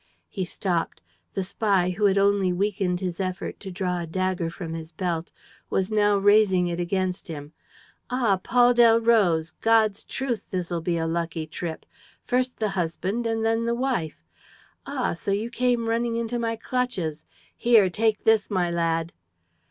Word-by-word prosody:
He 190 -3 -3
stopped. 175 -1 -2 0.4
The 195 - 0
spy, 190 -2 +1
who 200 +3 0
had 195 -1 +4
only 200 -2 +3
weakened 185 -1 -1
his 180 -1 -3
effort 185 -1 -4
to 195 - -7
draw 180 -1 -2
a 170 - -5
dagger 185 0 -1
from 165 -1 -6
his 165 0 -7
belt, 170 0 -3 0.4
was 190 +2 0
now 205 -1 +3
raising 200 -2 +4
it 175 0 -2
against 185 +1 -2
him: 150 -2 -8 0.6
"Ah, 235 -7 +1
Paul 245 +2 +4
Delroze!... 225 -8 +4
God's 220 -2 +3
truth, 260 -4 -3
this'll 175 -3 -2
be 170 +1 -1
a 165 - -1
lucky 165 -1 -2
trip!... 160 +1 -6 0.4
First 250 0 0
the 215 -1 0
husband 195 +5 -2
and 225 0 -1
then 225 +1 +1
the 235 0 0
wife.... 235 - -2 0.6
Ah, - - -1
so 170 - -6
you 210 +4 -1
came 245 -2 +1
running 230 +1 0
into 235 +1 -2
my 230 -1 -1
clutches!... 220 -11 -2 0.3
Here, 230 -5 +5
take 215 +4 0
this, 220 -2 +3
my 180 -3 0
lad! 165 -1 0
195 Hz, 160 wpm, -25 LUFS, 175-225 Hz, 0.6 s, Here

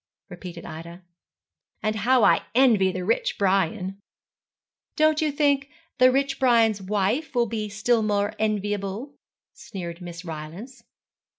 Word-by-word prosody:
repeated 175 -1 -9
Ida; 170 +3 -9 0.8
'and 215 0 0
how 245 +3 +3
I - - +4
envy 225 -8 +4
the 180 0 -4
rich 230 - 0
Brian!' 195 0 0 1.0
'Don't 310 0 +3
you 305 -1 +1
think 285 -1 +1 0.3
the 255 0 +7
rich 275 +1 0
Brian's 230 -5 +3
wife 210 +10 -1
will 240 -1 +3
be 215 -1 -4
still 220 +3 +1
more 205 -1 0
enviable?' 205 +3 -2 0.4
sneered 175 -3 -8
Miss 175 0 -8
Rylance. 165 - -8
210 Hz, 125 wpm, -25 LUFS, 185-250 Hz, 1.0 s, the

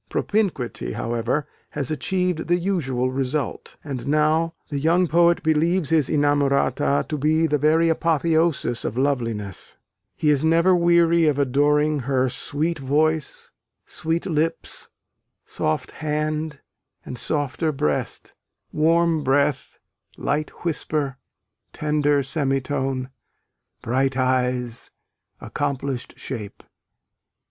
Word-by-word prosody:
Propinquity, 125 - -1
however, 120 +5 -1 0.2
has 140 +1 -3
achieved 180 +2 -1
the 175 +1 +3
usual 135 -9 -1
result; 135 0 -3
and 135 -4 -5
now 155 +3 +2 0.2
the 145 - -2
young 170 +5 +3
poet 170 +1 +3
believes 160 +1 +1
his 155 -4 +3
inamorata 145 -1 +2
to 150 - -3
be 155 +3 +2
the 150 -2 +1
very 160 +3 +3
apotheosis 160 -5 +1
of 115 - -3
loveliness: 115 -8 -2 0.4
he 150 - +3
is 145 0 +2
never 165 +3 +4
weary 170 -1 +4
of 145 -2 +2
adoring 145 +2 +2
her 130 0 +1
Sweet 155 +6 -2
voice, 150 +3 0 0.3
sweet 165 +1 -2
lips, 165 -2 -1 0.6
soft 80 - -2
hand, 155 0 -3 0.4
and - - -6
softer 150 +1 0
breast, 75 - -2 0.4
Warm 165 0 +2
breath, 140 +1 +1 0.4
light 150 +2 -1 0.2
whisper, 150 -4 -1 0.6
tender 150 -2 +1
semitone, 135 -2 -1 0.7
Bright 130 +2 0
eyes, 125 -2 0 0.5
accomplished 140 -3 -3
shape! 110 -7 -7
150 Hz, 105 wpm, -23 LUFS, 135-160 Hz, 0.7 s, never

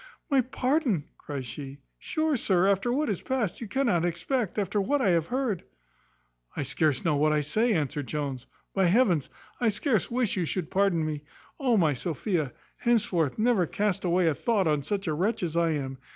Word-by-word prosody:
"My 275 -2 +5
pardon!" 255 - 0 0.2
cries 140 -3 -5
she; 135 +2 -7 0.2
"Sure, 315 -1 0
sir, 190 -6 +2
after 200 +4 +2
what 295 +5 +1
is 205 -6 -2
past, 245 -9 -2
you 230 - -4
cannot 210 -7 +1
expect, 175 +7 -1
after 205 0 0
what 285 +9 +1
I 240 - +2
have 165 -2 +2
heard." 245 -7 -1 1.0
"I - - 0
scarce 145 +1 0
know 160 -3 +3
what 155 +1 +3
I 150 -1 +2
say," 215 +11 +1
answered 145 -4 -1
Jones. 140 -4 -4 0.3
"By 195 -1 +2
heavens! 180 - +3 0.3
I 240 - +3
scarce 215 - 0
wish 240 -4 0
you 180 - +1
should 170 0 -3
pardon 185 -5 +2
me. 150 -2 -3 0.4
O 250 -5 +3
my 160 -6 +3
Sophia! 160 - -2 0.3
henceforth 195 - +1
never 220 -6 +2
cast 200 0 -1
away 180 0 +2
a 160 - +3
thought 210 - +1
on 150 -2 +2
such 195 +7 -2
a 160 - 0
wretch 190 +7 0
as 165 -2 -2
I 170 -1 +3
am. 135 -3 -4
185 Hz, 190 wpm, -27 LUFS, 155-230 Hz, 1.0 s, My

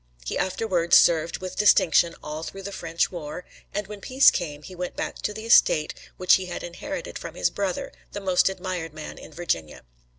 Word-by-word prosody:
He - - -3
afterwards 185 -3 +3
served 165 0 +3
with 185 -1 -6
distinction 175 -5 +4
all 150 +1 -5
through 195 +4 -7
the 200 - -5
French 165 -3 -1
war, 170 0 -6 0.3
and 205 0 -3
when 205 0 -9
peace 260 +5 +5
came 150 -5 -4
he 185 - -10
went 180 0 -5
back - - -4
to - - -1
the 220 +1 -7
estate 155 -8 +5 0.2
which 185 -1 +5
he 185 -1 -6
had 175 - -5
inherited 230 +12 -6
from - - -8
his - - +1
brother, 195 -3 -3 0.2
the 205 - -5
most 190 -1 +3
admired 180 -4 -5
man 155 - -8
in - - -12
Virginia. 115 - -3
180 Hz, 195 wpm, -25 LUFS, 165-195 Hz, 0.3 s, peace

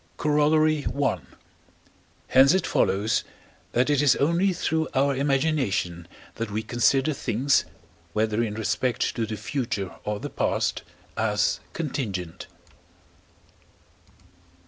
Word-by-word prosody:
Corollary 150 0 +3 0.2
I. 135 -10 +1 1.1
Hence 135 +6 +6
it 190 - +1
follows, 105 +3 +1 0.5
that 125 +2 +2
it 145 -1 +2
is 140 -4 +5
only 170 +7 +2
through 160 -2 -1
our 140 +1 +2
imagination 135 - 0 0.3
that 115 -1 -3
we 110 +2 -3
consider 130 +6 +2
things, 130 +1 +1 0.5
whether 110 +1 +1
in 110 -3 -2
respect 110 +3 -1
to 115 -2 -1
the 110 0 -4
future 105 -4 -3
or 105 -1 -3
the - - -6
past, - - 0 0.3
as - - +1
contingent. 105 - -4
130 Hz, 110 wpm, -25 LUFS, 105-150 Hz, 1.1 s, Hence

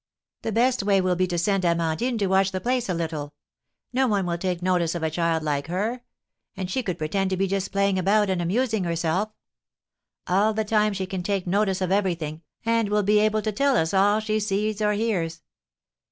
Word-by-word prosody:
The 225 - -3
best 245 +3 +2
way 195 -1 +3
will 185 -1 +1
be 185 +1 +1
to 175 -1 -2
send 195 +2 +1
Amandine 170 +8 0
to 205 - 0
watch 190 0 +3
the 190 - -2
place 250 0 -1
a - - +1
little; 155 -3 -4 0.6
no 260 +1 +2
one 200 -4 +1
will 170 -1 -1
take 180 -1 -2
notice 180 -2 +1
of 170 - -3
a 160 - 0
child 165 -1 0
like 145 -1 -1
her; 210 +8 -2 0.6
and 185 -1 -4
she 260 - 0
could 180 -7 -3
pretend 190 +5 -1
to 190 - -1
be 195 - +2
just 195 0 -2
playing 200 -1 +1
about, 205 +3 +3
and 185 -2 0
amusing 220 +4 0
herself; 170 +4 0 1.0
all 205 +4 +2
the 220 0 0
time 210 0 +2
she 190 -1 -3
can 185 0 -4
take 195 0 -1
notice 195 0 +1
of 185 -1 -1
everything, 170 -6 -1 0.2
and 230 -2 +1
will 210 0 +2
be 210 +2 +4
able 215 0 +2
to 215 - 0
tell 275 +4 +2
us 160 +2 0
all 205 +2 +4
she 215 0 -1
sees 210 +1 -1
or 210 0 +2
hears. 180 -7 -2
195 Hz, 210 wpm, -25 LUFS, 175-215 Hz, 1.0 s, be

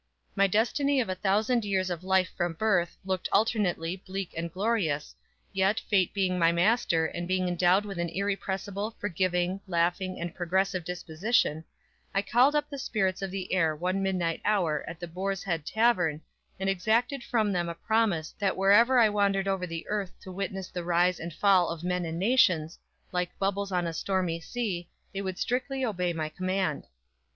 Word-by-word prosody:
My 200 0 +4
destiny 265 +8 +2
of 230 - 0
a - - +1
thousand 210 +5 +1
years 190 -2 0
of 175 0 -4
life 190 0 +2
from 175 -2 -1
birth, 180 -2 +1
looked 190 -1 -2
alternately, 195 -5 +1
bleak 195 0 -6
and 165 0 -3
glorious, 185 -7 -1 0.4
yet 195 +2 +2
Fate 190 -4 +1
being 185 -2 0
my 165 0 +5
master, 170 -2 +2
and 175 +2 -4
being 185 0 +1
endowed 180 +3 +3
with 195 -4 -6
an 170 0 -1
irrepressible, 200 +2 -3
forgiving, 185 -1 0
laughing 180 +1 0
and 170 -1 -4
progressive 185 +1 0
disposition, 175 +1 0 0.5
I 195 - +2
called 250 +7 +4
up 295 - +1
the 280 - -7
spirits 195 -8 -1
of 195 - -2
the 185 -1 -4
air 165 -4 +2
one 185 +5 -1
midnight 180 -4 -1
hour 175 -8 +1
at 165 0 -7
the 175 - -5
Boar's 190 +3 -3
Head 165 -5 -2
Tavern, 180 -10 +2 0.4
and 190 - -2
exacted 225 +7 +1
from 220 -4 +1
them 175 -2 -1
a 170 - -5
promise 195 -4 0
that 195 -2 0
wherever 210 +7 +5
I 230 -2 +7
wandered 200 -2 +1
over 190 -2 -1
the 165 -1 -6
earth 205 -3 -3
to 185 - -9
witness 195 0 -4
the 175 - -5
rise 175 +1 +2
and 170 +1 -5
fall 185 0 +3
of 170 0 -5
men 180 0 -1
and 165 0 -4
nations, 185 -7 +3 0.3
like 180 -1 -2
bubbles 200 0 -1
on 180 -1 0
a 165 - -3
stormy 180 -2 -1
sea, 180 -3 -4 0.2
they 195 - -3
would 190 -2 -4
strictly 260 +2 -1
obey 180 -6 -1
my 160 -2 -2
command. 185 -1 -2
185 Hz, 180 wpm, -28 LUFS, 175-205 Hz, 0.5 s, I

